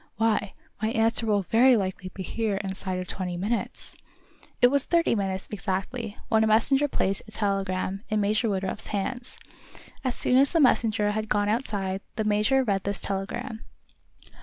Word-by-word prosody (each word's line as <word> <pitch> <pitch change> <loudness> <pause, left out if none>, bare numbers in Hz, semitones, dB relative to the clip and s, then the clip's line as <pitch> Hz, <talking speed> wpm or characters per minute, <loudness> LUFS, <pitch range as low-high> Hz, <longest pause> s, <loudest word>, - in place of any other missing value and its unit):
Why, 215 -2 +1 0.3
my 220 - +1
answer 225 0 +2
will 205 -2 +2
very 240 +5 +5
likely 185 -2 -3
be 190 - -6
here 220 +2 -1
inside 190 -1 -3
of 185 - -3
twenty 180 -1 -4
minutes!" 215 +6 -2 0.6
It 245 - +6
was 280 -1 +3
thirty 335 +1 +2
minutes, 195 -3 -2
exactly, 205 +3 -3
when 220 -1 +3
a - - +3
messenger 270 +7 +3
placed 195 -7 -1
a - - -12
telegram 195 -2 -1
in 215 - +1
Major 215 +3 +1
Woodruff's 190 -1 -3
hands. 240 +5 -4 0.7
As 255 -2 -1
soon 250 - +2
as 275 +4 +5
the 335 - +3
messenger 220 -6 +3
had 215 +1 -3
gone 205 0 +2
outside, 200 -5 -1
the 220 - -1
major 215 +6 +3
read 200 -5 0
this 200 0 -2
telegram. 220 +5 -4
210 Hz, 165 wpm, -26 LUFS, 195-230 Hz, 0.7 s, It